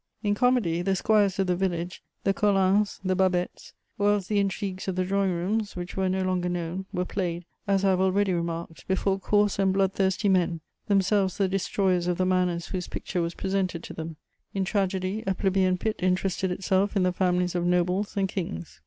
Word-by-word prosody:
In 205 -1 +2
comedy, 210 -8 +2
the 190 +1 +1
squires 205 -1 +2
of 195 - +2
the 180 -1 +1
village, 175 -1 -2 0.2
the 195 - +2
Colins, 200 0 +2
the 185 -1 +1
Babets, 185 -1 0 0.3
or 205 0 +4
else 205 -2 -1
the 205 +1 +1
intrigues 195 -1 -2
of 190 - -1
the 185 0 0
drawing 195 +1 +1
rooms, 200 +5 -1
which 180 +1 -6
were 190 -1 +1
no 190 0 0
longer 180 -1 0
known, 175 +2 -3
were 180 0 -1
played, 175 -3 -3 0.2
as 195 0 +2
I - - +5
have 185 0 +2
already 190 0 +2
remarked, 170 -3 -4
before 190 +1 +1
coarse 205 0 +2
and 195 -1 +3
blood 195 0 +2
thirsty 190 +2 +1
men, 175 -4 +2 0.3
themselves 195 -1 +2
the 195 - +2
destroyers 185 -1 0
of 175 -1 0
the 185 - +1
manners 180 -2 0
whose 185 -2 -3
picture 180 - -3
was 170 0 -2
presented 190 -3 -1
to - - -8
them; 160 0 -6 0.4
in 195 -1 0
tragedy, 195 +1 -1
a 190 - +1
plebeian 190 -1 +2
pit 220 +3 -2
interested 185 +1 0
itself 190 +3 0
in 195 - +3
the 180 0 +2
families 180 -1 +1
of 175 -1 0
nobles 180 +4 +1
and 195 -1 +2
kings. 80 - -5
190 Hz, 200 wpm, -26 LUFS, 180-195 Hz, 0.4 s, I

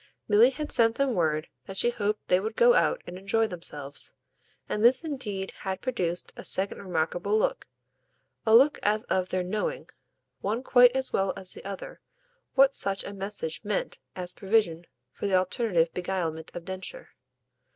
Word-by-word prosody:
Milly 220 +4 +6
had 295 +3 -5
sent 230 -1 +4
them 275 -2 +1
word 155 -4 0 0.2
that 195 - -6
she 240 - +3
hoped 210 -2 -2
they 180 - +4
would 220 +3 -4
go 485 0 +6
out - - +2
and 180 - -8
enjoy 210 +4 +1
themselves, 150 -7 -4 0.5
and 210 - -2
this 250 +7 +5
indeed 215 -11 -3
had 190 -1 -3
produced 180 -9 -2
a - - -9
second 195 +1 +1
remarkable 180 +3 -1
look, 215 - -1 0.8
a 220 0 +5
look 275 +5 +6
as 210 +1 +1
of 185 -5 -1
their 185 0 -1
knowing, 215 - -3 0.5
one 220 +5 -2
quite 245 -1 +6
as 265 0 -1
well 195 -1 +1
as 185 -1 -6
the - - -11
other, 195 -1 -7 0.5
what 275 0 +6
such 195 -1 +1
a 200 - -7
message 195 -4 -4
meant 205 -2 -2 0.2
as 180 -1 -3
provision 190 -5 0 0.3
for - - -3
the 195 - +2
alternative 185 -3 +1
beguilement 175 -3 -3
of 170 -1 -7
Densher. 190 - -6
200 Hz, 170 wpm, -27 LUFS, 180-230 Hz, 0.8 s, Milly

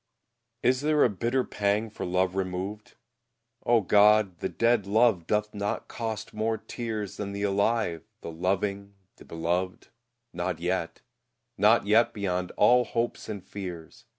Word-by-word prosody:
] 120 0 -52
Is 130 +1 +3
there 150 0 +3
a - - +4
bitter 120 +6 0
pang 105 +1 -1
for - - -5
love 90 +1 +1
removed, 95 +2 -4 0.7
O 120 -1 +5
God! 105 -2 +4
The - - -2
dead 115 -4 +1
love 105 -5 +3
doth 105 0 0
not 100 0 -3
cost 110 -2 -5
more 110 +1 -1
tears 110 -5 -5
Than 100 -1 -4
the 100 0 -4
alive, 100 -3 +1 0.2
the - - -6
loving, 100 +3 -2 0.2
the - - -15
beloved 85 +3 -3 0.4
Not 90 0 -2
yet, 90 -1 -2 0.5
not 105 +2 +4
yet 110 +3 +3
beyond 90 -3 -2
all 125 +4 +5
hopes 115 0 -3
and 100 -4 -6
fears! 90 -5 -8
105 Hz, 150 wpm, -27 LUFS, 95-115 Hz, 0.7 s, O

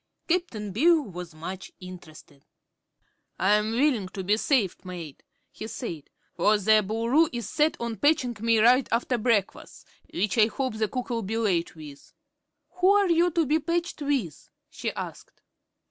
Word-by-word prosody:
Cap'n 285 - -1
Bill 315 - +4
was 180 - -9
much 185 +4 -7
interested. 160 -6 -13 0.9
"I'm 210 +3 +2
willing 245 -6 +1
to 190 0 -6
be 205 +3 +2
saved, 225 - 0
mate," 175 -6 -8 0.3
he 220 - -8
said, 170 - -7 0.2
"for 215 0 +3
the 215 +2 +4
Boo 220 +3 -3
l'roo 300 +7 +4
is 240 -2 -5
set 305 +1 +1
on 235 -2 -4
patchin' 285 -5 +2
me 230 +1 +2
right 245 +4 +4
after 240 +1 0
breakfas', 215 -4 -1 0.3
which 200 +3 -1
I 215 - +6
hope 260 +2 -3
the 215 0 +1
cook'll 245 0 -3
be 220 +2 -3
late 185 -8 0
with." 150 -3 -12 0.6
"Who 365 +1 +4
are 400 -2 +4
you 340 +1 +4
to 335 -1 +1
be 305 +3 +2
patched 340 +1 -2
with?" 275 - -2 0.2
she - - -4
asked. - - -8
225 Hz, 160 wpm, -26 LUFS, 190-285 Hz, 0.9 s, I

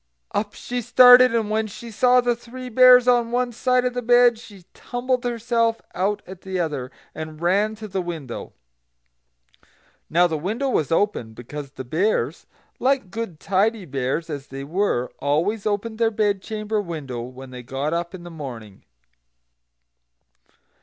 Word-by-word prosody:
Up 205 0 -2
she 245 0 -4
started, 250 +1 +7
and 220 -2 0
when 220 0 0
she 230 +3 -10
saw 250 +3 +4
the 240 -1 +1
Three 250 +2 -9
Bears 250 +1 +7
on 240 -2 +3
one 245 0 0
side 250 +2 +1
of 250 - 0
the 245 - -2
bed, 245 -1 +5
she 200 -5 -14
tumbled 250 +1 -2
herself 230 -1 0
out 205 +3 -1
at 185 -1 -11
the 190 -1 -4
other, 145 -7 -2 0.2
and 155 -1 -7
ran 200 +6 +1
to 215 0 -8
the 190 -1 -2
window. 160 -8 -6 1.6
Now 175 +3 +4
the 160 -3 -1
window 225 - -2
was 160 - 0
open, 165 - 0
because 140 +4 -8
the 130 -1 -8
Bears, 160 - -1 0.3
like 255 -7 +1
good, 205 -7 -5
tidy 200 +2 0
Bears 135 +3 -2
as 145 -3 -6
they 135 +1 -7
were, 150 -6 -1
always 170 +10 0
opened 220 +2 -2
their 230 -1 +3
bed 205 -3 0
chamber 215 +1 -2
window 150 -10 -6
when 130 +2 -10
they 125 -1 -8
got 135 +5 -3
up 170 +2 -3
in 175 - -10
the 175 - -9
morning. 120 -10 -9
205 Hz, 160 wpm, -23 LUFS, 155-235 Hz, 1.6 s, started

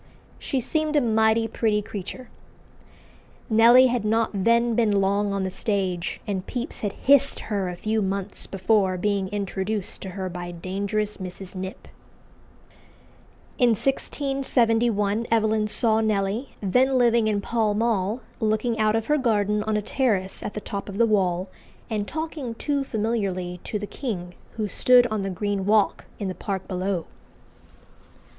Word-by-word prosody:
She 270 - -1
seemed 310 +4 -1
a - - +6
mighty 220 -2 +2
pretty 215 -2 0
creature." 205 +6 -7 1.2
Nelly 235 +4 +7
had 245 -3 +1
not 225 +1 +1
then 235 +4 +2
been 215 -3 +2
long 200 +1 +1
on 200 -1 -1
the 190 - -2
stage, 190 -3 -2
and 195 -4 -2
Pepys 250 +2 -4
had 205 -2 -2
hissed 280 0 +3
her 195 -3 0
a 180 - -5
few 215 +4 -1
months 195 0 -3
before 195 -1 +1
being 200 0 0
introduced 200 0 -3
to 190 - -6
her 190 -1 -2
by 175 -1 -6
dangerous 200 +4 -2
Mrs. 185 0 -8
Knipp. 190 0 -7 1.7
In 240 -2 +5
1671 235 -5 0
Evelyn 220 -1 +2
saw 220 +1 +3
Nelly, 215 +3 -1
then 255 +7 +3
living 235 -2 +3
in 210 -2 +1
Pall 220 0 0
Mall, 220 0 0 0.2
"looking 220 +1 0
out 215 0 +3
of 225 -1 0
her 300 0 +2
garden 210 -4 +1
on 215 -1 +1
a 210 - -2
terrace 205 -7 0
at - - -5
the 210 - -4
top 200 0 -5
of 200 - -6
the 235 - +5
wall," 190 -4 +1 0.4
and 210 -2 -1
talking 315 -7 -4
too 285 +2 -1
familiarly 200 -7 -2
to 210 - -2
the 205 - -4
king, 195 -8 -5 0.2
who 215 -2 -2
stood 250 +4 +5
on 215 -2 -1
the 195 - -2
green 200 +1 -2
walk 210 +1 +2
in 200 - -3
the 185 - -2
park 190 +1 -4
below. 185 -1 -2
210 Hz, 155 wpm, -24 LUFS, 195-230 Hz, 1.7 s, Nelly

